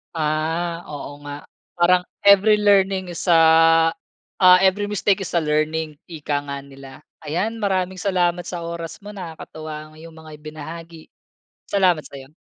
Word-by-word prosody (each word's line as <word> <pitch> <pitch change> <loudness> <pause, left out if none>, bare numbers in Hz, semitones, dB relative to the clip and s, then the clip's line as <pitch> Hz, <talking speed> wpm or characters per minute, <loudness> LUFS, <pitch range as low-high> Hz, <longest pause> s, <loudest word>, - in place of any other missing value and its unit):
Ah, 160 +2 -2
oo 145 -1 -8
nga. 145 - -6 0.4
Parang 180 +1 +3 0.2
every 200 +1 +6
learning 195 -2 +2
is 175 - -6
ah, 165 -1 +5 0.5
ah, 185 -1 +6
every 195 +2 +2
mistake 205 -1 +1
is - - -8
a 170 - +2
learning, 155 0 -1
ika 155 -3 -6
nga 140 -1 -5
nila. 135 0 -13 0.2
Ayan, 190 +9 -2
maraming 190 -3 -1
salamat 180 -2 0
sa 175 -1 -5
oras 170 +2 -7
mo. 205 - -10
Nakakatuwa 155 -5 -8
ang - - -20
'yong 165 +1 -12
mga 160 -1 -12
ibinahagi. 160 +2 -10 0.6
Salamat 185 -5 +2
sa'yo. 135 +1 -12
165 Hz, 145 wpm, -21 LUFS, 155-185 Hz, 0.6 s, every